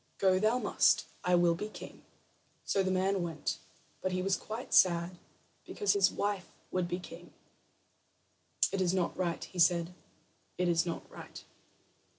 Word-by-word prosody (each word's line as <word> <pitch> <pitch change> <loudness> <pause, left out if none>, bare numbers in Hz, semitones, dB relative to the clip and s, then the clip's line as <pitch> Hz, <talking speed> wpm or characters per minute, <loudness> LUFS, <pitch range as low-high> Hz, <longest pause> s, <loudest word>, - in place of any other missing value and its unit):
"Go 190 -1 +3
thou 215 +4 +2
must. - - +3 0.2
I 180 0 +3
will 175 -1 +4
be 210 +6 -5
king." - - -11 0.6
So 195 - +1
the 190 - 0
man 190 +1 +1
went; 165 -3 -3 0.4
but 185 - -1
he 185 0 -1
was 195 0 +2
quite 225 +3 -7
sad 175 0 +4 0.4
because 415 - 0
his 195 -2 +4
wife 200 -2 -2 0.2
would 185 -1 0
be 175 0 -2
king. 180 - -12 1.4
"It 195 - -1
is 185 0 +1
not 180 -2 0
right," 175 -2 -2
he 180 - -8
said; 170 +1 +3 0.6
"it 180 - +1
is 170 0 +2
not 170 - -5
right." - - -11
185 Hz, 160 wpm, -31 LUFS, 175-195 Hz, 1.4 s, will